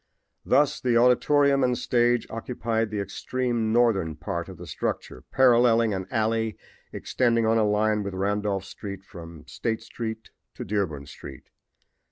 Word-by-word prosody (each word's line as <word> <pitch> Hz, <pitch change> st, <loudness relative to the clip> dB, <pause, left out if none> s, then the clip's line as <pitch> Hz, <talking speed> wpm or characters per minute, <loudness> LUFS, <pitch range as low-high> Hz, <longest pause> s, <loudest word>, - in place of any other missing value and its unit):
Thus 145 Hz, 0 st, +2 dB
the 120 Hz, -2 st, +2 dB
auditorium 140 Hz, +3 st, +4 dB
and 125 Hz, -1 st, +1 dB
stage 120 Hz, -1 st, +2 dB
occupied 115 Hz, -1 st, -2 dB
the 105 Hz, -1 st, -3 dB
extreme 115 Hz, +3 st, -2 dB
northern 110 Hz, -9 st, +2 dB
part 85 Hz, +4 st, -5 dB
of 95 Hz, -, -10 dB
the 90 Hz, -, -9 dB
structure, 65 Hz, -4 st, -4 dB
paralleling 120 Hz, -3 st, +4 dB
an 95 Hz, -1 st, -4 dB
alley 110 Hz, 0 st, 0 dB, 0.3 s
extending 115 Hz, -2 st, 0 dB
on 115 Hz, +1 st, +3 dB
a 105 Hz, -1 st, +2 dB
line 105 Hz, 0 st, +1 dB
with 100 Hz, -2 st, -5 dB
Randolph 100 Hz, 0 st, -1 dB
street 100 Hz, -1 st, -8 dB
from 85 Hz, -5 st, -11 dB
State 115 Hz, -1 st, -3 dB
street 110 Hz, -1 st, -6 dB, 0.2 s
to -, -, -6 dB
Dearborn 90 Hz, -9 st, -2 dB
street. 70 Hz, -1 st, -12 dB
110 Hz, 145 wpm, -25 LUFS, 100-120 Hz, 0.3 s, auditorium